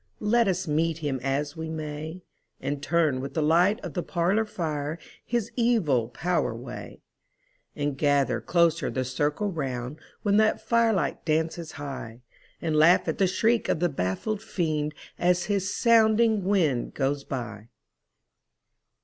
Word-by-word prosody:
Let 230 +1 +4
us 185 -1 -1
meet 160 +2 +1
him 145 -5 -2
as 140 +3 -1
we 160 0 -5
may, 155 +2 -6 0.4
And 140 +1 -3
turn 155 -4 +1
with 140 - -6
the 160 - +1
light 175 +8 +4
of - - -6
the 175 - -1
parlor 185 +6 +1
fire 155 -6 -3 0.3
his 235 -3 -2
evil 180 - +2
power 175 +8 0
away; - - -9 0.7
And 145 -2 -2
gather 145 -2 +2
closer 170 -3 +2
the 130 -1 -2
circle 145 +10 -1
round, 135 -3 -4 0.2
when 205 -1 +3
that 215 0 +3
fire 235 -1 +2
light 175 -10 -1
dances 160 +1 -1
high, 130 -5 -7 0.4
And 160 -2 -1
laugh 165 +4 +5
at - - -2
the 195 - +4
shriek 225 +5 +1
of - - +1
the 175 +1 +2
baffled 140 - -2
Fiend 155 -6 -2 0.2
as 180 0 +2
his 200 -1 -1
sounding 225 -3 +4
wing 165 -11 +1
goes 140 0 0
by! 115 -6 -6
160 Hz, 150 wpm, -26 LUFS, 145-195 Hz, 0.7 s, laugh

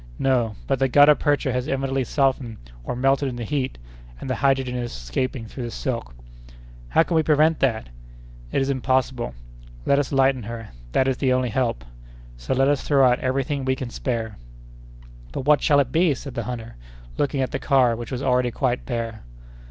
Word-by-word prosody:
"No, 120 -5 +1
but 135 -2 0
the 135 - +3
gutta 145 +3 +7
percha 145 -3 0
has 125 +1 -2
evidently 135 -1 -1
softened 130 -3 0 0.3
or 60 - -4
melted 135 +2 +2
in 125 - -6
the 120 - -5
heat, 135 +2 -2 0.4
and - - -7
the 130 - 0
hydrogen 135 -2 +1
is 120 -1 -3
escaping 115 - -3
through 120 +4 -8
the - - -4
silk." 115 - -4 0.7
"How 160 - +4
can 170 - -4
we 160 - +4
prevent 155 +1 +3
that?" 115 - 0 0.6
"It 135 - +1
is 135 - 0
impossible. 130 - 0 0.5
Let 140 - +3
us 145 - -2
lighten 135 -1 +3
her. 115 0 -7 0.2
That 130 - +3
is 130 -1 0
the 130 -2 +1
only 130 -1 +1
help. 115 - -1 0.5
So - - -3
let 135 +1 +3
us 145 -1 +2
throw 135 -3 +4
out 125 0 +2
every 130 +1 0
thing 140 0 -3
we 130 0 +1
can 130 -2 -6
spare." 115 -5 -3 1.0
"But - - -4
what 150 0 +5
shall 145 -1 +4
it 130 -3 +1
be?" 160 0 +3
said 135 +1 -8
the 115 -2 -4
hunter, 115 - -6 0.4
looking 140 -1 0
at 130 - -1
the - - -2
car, 130 -5 +3
which 120 +2 -7
was 130 +1 -3
already 125 -1 +2
quite 125 0 -1
bare. 115 -3 -3
130 Hz, 200 wpm, -23 LUFS, 120-135 Hz, 1.0 s, gutta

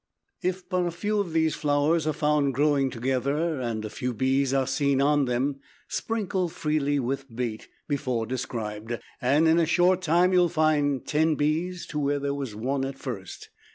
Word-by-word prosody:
If 185 0 -2
but 180 -1 0
a - - 0
few 205 +5 -1
of 195 -5 -1
these 160 -1 +2
flowers 150 +2 +1
are 155 - +1
found 150 -2 +1
growing 140 -1 +2
together 135 +5 -1
and 115 -3 -3
a - - -4
few 125 0 -3
bees 130 +3 +1
are 135 -1 +2
seen 140 0 +1
on 145 0 +3
them, 130 +3 -1 0.3
sprinkle 195 -5 -1
freely 150 -2 0
with 135 +2 -2
bait 115 -3 -3 0.2
before 130 -5 -1
described, 115 -2 -4 0.2
and 145 +6 +3
in 160 +1 +5
a 165 - +2
short 180 +2 +3
time 175 +2 +3
you 180 - +5
will 175 -1 +4
find 150 -5 +1
ten 155 +1 +2
bees 165 +5 -1
to 150 - -4
where 145 0 +1
there 140 0 -2
was 135 -6 -5
one 135 +5 -1
at 135 0 -4
first. 105 -10 -7
145 Hz, 185 wpm, -26 LUFS, 130-160 Hz, 0.3 s, in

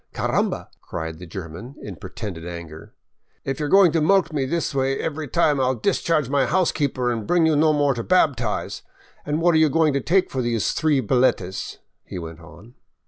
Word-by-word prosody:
"Caramba!" - - -1
cried 80 -1 -6
the 90 - -9
German, 95 - -8
in 100 - -8
pretended 95 -2 -7
anger. 85 -2 -9 0.5
"If 135 +1 -3
you're 150 -1 -2
going 195 -2 +6
to 165 - +1
mulct 190 +1 +3
me 140 -3 0
this 165 +1 -1
way 135 0 0
every 155 -1 -3
time, 150 -1 +2
I 130 - +2
'11 125 -3 -1
discharge 165 -7 +1
my 135 -1 +1
housekeeper 145 -7 0
and 115 -3 -4
bring 175 -2 +3
you 160 -1 +3
no 155 +1 +4
more 145 -2 +2
to 120 - -4
baptise. 130 - 0 0.5
And 150 +2 -1
what 175 0 +4
are 160 - +4
you 155 -1 +5
going 155 0 +2
to 140 - 0
take 185 +7 +1
for 130 - -1
those 120 -3 0
three 155 -4 +1
billetes? 110 -6 0
" - - -53
he - - -6
went 85 -1 -7
on. 100 +8 -15
135 Hz, 200 wpm, -23 LUFS, 105-155 Hz, 0.5 s, going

